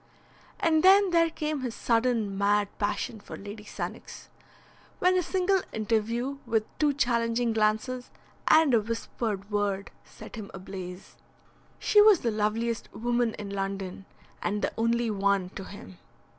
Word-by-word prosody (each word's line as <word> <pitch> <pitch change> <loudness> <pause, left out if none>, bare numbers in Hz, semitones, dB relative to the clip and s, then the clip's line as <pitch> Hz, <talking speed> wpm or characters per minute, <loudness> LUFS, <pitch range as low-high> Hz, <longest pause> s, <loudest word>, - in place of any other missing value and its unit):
And 315 -1 +3
then 390 +1 +6
there 335 -1 +4
came 305 -2 -3
his 245 -3 -4
sudden 230 -4 +1
mad 205 +1 +2
passion 210 +2 -2
for 205 - -9
Lady 205 +1 -9
Sannox, - - -7 0.7
when 365 +1 +3
a 365 - +3
single 375 +2 +1
interview 230 +5 -1
with 220 -2 +1
two 300 -1 +4
challenging 235 -3 +1
glances 220 +4 0 0.4
and 315 -4 +6
a 230 - +5
whispered 215 -2 -4
word 200 -1 -1
set - - -12
him 210 -3 -7
ablaze. 185 -1 -8 0.6
She 420 - +5
was 415 -4 +6
the 235 - 0
loveliest 220 +2 -1
woman 240 -1 0
in 205 -1 -7
London, 195 -1 -4 0.3
and 210 0 -1
the - - 0
only 230 0 +1
one 200 -2 +1
to 195 - -7
him. 195 -2 -11
225 Hz, 145 wpm, -28 LUFS, 205-255 Hz, 0.7 s, then